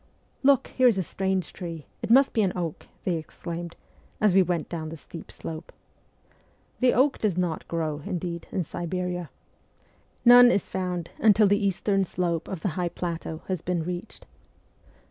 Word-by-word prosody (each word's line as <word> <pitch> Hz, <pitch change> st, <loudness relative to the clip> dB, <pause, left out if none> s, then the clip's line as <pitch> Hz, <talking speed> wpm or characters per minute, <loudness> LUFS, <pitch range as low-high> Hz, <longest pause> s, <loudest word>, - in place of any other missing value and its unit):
' -, -, -38 dB
Look, 275 Hz, -1 st, +4 dB
here 255 Hz, -1 st, +4 dB
is 230 Hz, -5 st, +4 dB
a 190 Hz, -, +1 dB
strange 190 Hz, +1 st, -2 dB
tree: 165 Hz, -4 st, -7 dB, 0.2 s
it -, -, -4 dB
must 265 Hz, +4 st, +6 dB
be 225 Hz, -, +2 dB
an 190 Hz, -3 st, +1 dB
oak,' 170 Hz, -4 st, -4 dB, 0.2 s
they 175 Hz, -3 st, 0 dB
exclaimed, 170 Hz, +2 st, -7 dB, 0.4 s
as 210 Hz, -3 st, +4 dB
we 190 Hz, -, +6 dB
went 175 Hz, -3 st, 0 dB
down 160 Hz, -2 st, -5 dB
the 165 Hz, -, -7 dB
steep 165 Hz, -, -10 dB
slope. 160 Hz, +1 st, -7 dB, 1.1 s
The 255 Hz, -1 st, +4 dB
oak 265 Hz, +2 st, +3 dB
does 205 Hz, -5 st, 0 dB
not 175 Hz, -3 st, -1 dB
grow, 155 Hz, -3 st, -2 dB
indeed, 170 Hz, -1 st, -4 dB
in 185 Hz, -, -1 dB
Siberia. 175 Hz, 0 st, -3 dB, 1.0 s
None 245 Hz, 0 st, +9 dB
is 200 Hz, -, +1 dB
found 180 Hz, -2 st, -3 dB
until 215 Hz, -1 st, +6 dB
the 205 Hz, +1 st, +3 dB
eastern 195 Hz, +1 st, +1 dB
slope 170 Hz, -2 st, -2 dB
of 185 Hz, -4 st, -5 dB
the 195 Hz, -, 0 dB
high 175 Hz, +1 st, -2 dB
plateau 165 Hz, -2 st, -5 dB
has 185 Hz, -4 st, -2 dB
been 175 Hz, -2 st, -1 dB
reached. 180 Hz, +4 st, -6 dB
180 Hz, 170 wpm, -26 LUFS, 170-195 Hz, 1.1 s, None